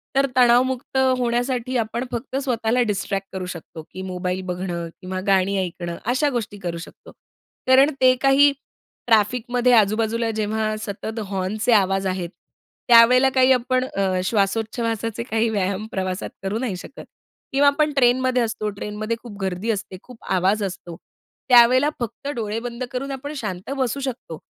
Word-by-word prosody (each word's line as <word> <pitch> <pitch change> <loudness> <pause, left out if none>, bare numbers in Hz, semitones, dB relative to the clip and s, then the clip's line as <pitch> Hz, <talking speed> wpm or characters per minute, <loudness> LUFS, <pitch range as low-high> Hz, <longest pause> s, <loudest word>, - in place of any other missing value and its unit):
तर 275 0 +4
तणावमुक्त 255 +1 +3 0.2
होण्यासाठी 245 +1 -1
आपण 230 +1 -2
फक्त 245 +2 -5
स्वतःला 240 -2 0
डिस्ट्रॅक्ट 195 -1 -2
करू 190 -1 -4
शकतो, 170 -2 -8
की 185 - -7
मोबाईल 180 0 -3
बघणं 175 -2 -4
किंवा 185 0 -4
गाणी 195 0 +2
ऐकणं 175 -1 -6
अशा 285 +4 +2
गोष्टी 225 -5 -4
करू 175 -3 -4
शकतो. 170 - -12 0.6
कारण 265 +2 +6
ते 255 0 +6
काही 275 +1 +5 0.6
ट्रॅफिकमध्ये 245 +3 +2
आजूबाजूला, 225 +1 +2
जेव्हा 215 0 -1
सतत 220 +2 -5
हॉर्नचे 195 +4 -1
आवाज 195 -2 +2
आहेत 185 -2 -3 0.6
त्यावेळेला 245 +3 +7
काही 260 0 +5
आपण 255 0 +2
अ, 190 -6 -1
श्वासोच्छवासाचे 225 +2 -1
काही 225 -1 0
व्यायाम 200 -1 -1
प्रवासात 185 -1 -3
करू 195 +3 -2
नाही 235 -6 -2
शकत. 225 - -10 0.5
किंवा 280 +1 +4
आपण 300 +2 +3
ट्रेनमध्ये 255 0 +3
असतो 215 -2 -2
ट्रेनमध्ये 210 +2 -4
खूप 220 -4 -10
गर्दी 190 +3 -3
असते, 205 -3 -5
खूप 250 -2 -15
आवाज 190 +3 +2
असतो 180 -3 -6 0.5
त्यावेळेला 250 +3 +6
फक्त 240 +3 -5
डोळे 220 -1 -3
बंद 240 +1 -6
करून 275 +2 -4
आपण 280 +2 -6
शांत 190 -6 -5
बसू 260 0 -1
शकतो, 250 - -5
225 Hz, 145 wpm, -22 LUFS, 195-250 Hz, 0.6 s, त्यावेळेला